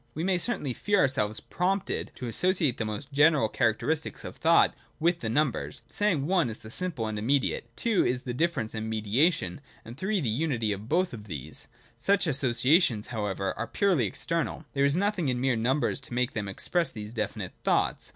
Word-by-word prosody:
We 160 - -2
may 185 -1 +2
certainly 165 - -1
feel 205 - +1
our 135 - +5
selves 110 -5 0
prompted 190 +2 -1
to 125 - -6
associate 160 +2 +1
the 110 - -2
most 110 +7 -5
general 145 -4 +5
characteristics 120 +9 0
of - - -7
thought 165 +1 +4 0.3
with 170 +2 +2
the 110 - -4
first 110 - -1
numbers: 150 -4 0
saying, 185 -10 0
1 175 -6 +2
is 110 - -6
the 110 - -12
simple 165 -7 -1
and 110 -1 -3
immediate; 120 0 0
2 230 -4 +2
is 125 0 -1
difference 125 -2 -1
and 110 0 -4
mediation; 110 - +1 0.2
and 120 +3 -10
3 200 +1 0
the 140 - -2
unity 115 -2 0
of 105 +3 -5
both 180 +2 +1
of 105 -3 -8
these. 75 -6 -6 0.3
Such 200 -1 +3
associations 130 - +2
however 105 -4 -2
are 115 - -3
purely 180 - +2
external: 165 - -2
there 140 0 +2
is 140 +3 +2
nothing 195 -6 +1
in 125 - 0
the - - -3
mere 130 -2 +2
numbers 130 +8 +1
to 135 -3 -8
make 125 +1 0
them 105 -3 -3
express 165 - -1
these 105 0 -8
definite 120 - -3
thoughts. - - +1
135 Hz, 195 wpm, -28 LUFS, 110-170 Hz, 0.3 s, our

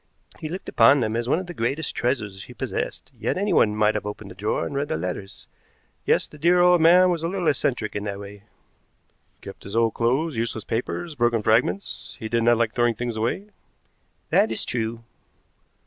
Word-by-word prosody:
He 155 - -5
looked 185 +4 -6
upon 140 - +5
them 110 -2 -1
as 120 +1 -2
one - - +3
of 185 - -4
the 175 - -8
greatest 140 +4 -2
treasures 110 -6 -2
he - - -13
possessed, - - -4
yet - - -1
anyone 185 - +2
might 105 0 +3
have 105 -1 -3
opened 105 -1 -7
the - - -11
drawer 105 +3 -1
and - - -5
read 140 +1 -1
the - - -2
letters. 90 +3 -6 0.6
Yes, - - +3
the 150 - -15
dear 175 +4 +4
old 175 -1 +5
man 180 +3 +6
was 170 -2 -1
a 165 - -1
little 180 -1 -2
eccentric 125 -7 0
in 105 0 -3
that 100 -1 -4
way." 100 0 -10 1.0
"Kept - - -10
his 100 +2 -8
old 115 -1 +2
clothes, 135 +7 0
useless 115 -1 -2
papers, 125 +10 -3
broken 120 -4 +1
fragments. 120 - 0
He 110 -3 -5
did 115 +1 +1
not 120 0 +4
like 115 -1 0
throwing 120 -1 +2
things 120 +1 -3
away." 120 - -2 0.8
"That 110 - +4
is 110 - -1
true." 115 -1 -3
120 Hz, 200 wpm, -24 LUFS, 110-155 Hz, 1.0 s, man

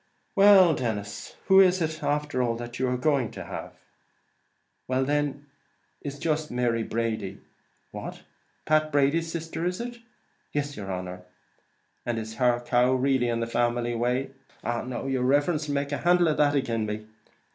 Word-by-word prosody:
"Well, 195 -4 +7
Denis; 105 -6 -4
and - - -30
who 190 0 +7
is 185 -1 +5
it 160 -1 -2
after 145 -2 0
all 120 -2 +1
that 120 +1 -7
you 130 - +1
are 125 0 0
going 130 -3 +1
to - - -6
have?" - - -7 1.1
"Well, 130 +1 +1
then, 145 0 -1 0.6
it's 145 -1 -5
jist 155 0 -1
Mary 120 -2 0
Brady." 115 -3 -2 0.5
"What! - - -7 0.4
Pat 155 0 +2
Brady's 150 +4 +2
sister 165 0 -4
is 180 +1 -1
it?" 240 0 -6 0.6
"Iss, 145 -1 -1
yer 100 -2 -7
honer." 90 -1 -5 0.8
"And 120 -1 -2
is 110 0 -6
her 120 -2 +3
cow 125 +1 +3
really 130 -1 +2
in 115 0 -1
the - - 0
family 120 0 0
way?" 125 +3 0 0.3
"Now 120 +2 -3
yer 135 -1 0
riverence 145 +4 +2
'll - - 0
make 140 0 -1
a 140 - 0
handle 175 -1 +4
of 155 - 0
that 145 -1 +3
agin 115 -5 0
me!" 105 +1 -4
130 Hz, 170 wpm, -27 LUFS, 120-150 Hz, 1.1 s, Well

